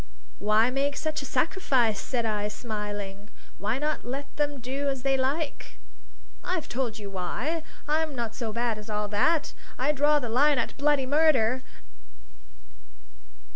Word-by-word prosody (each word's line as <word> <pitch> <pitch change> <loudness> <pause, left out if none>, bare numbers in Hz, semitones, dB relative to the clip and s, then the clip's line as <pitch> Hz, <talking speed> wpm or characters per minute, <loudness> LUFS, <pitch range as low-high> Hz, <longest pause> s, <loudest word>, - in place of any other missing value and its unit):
"Why 215 +4 +4
make 280 +2 0
such 310 -1 -1
a - - -6
sacrifice?" 255 - +2
said 240 -3 -1
I, 210 -1 0
smiling. 205 -2 -5 0.3
"Why 210 +5 0
not 300 +2 -1
let 275 +4 -5
them 290 -1 0
do 270 +4 -2
as 270 -2 -3
they 270 0 +3
like?" 280 +3 -2 0.7
"I've 360 -4 -2
told 240 -3 -2
you 205 -2 -7
why! 240 - -2 0.3
I'm 310 -1 +1
not 235 -3 -2
so 230 -2 -3
bad 230 -1 -1
as 210 +1 -10
all 210 0 -1
that. 300 +10 +2 0.2
I 265 +4 +2
draw 295 +1 +4
the 260 -4 -1
line 280 +5 +4
at - - -1
bloody 285 -1 +2
murder! 260 -4 +4
255 Hz, 150 wpm, -28 LUFS, 220-290 Hz, 0.7 s, Why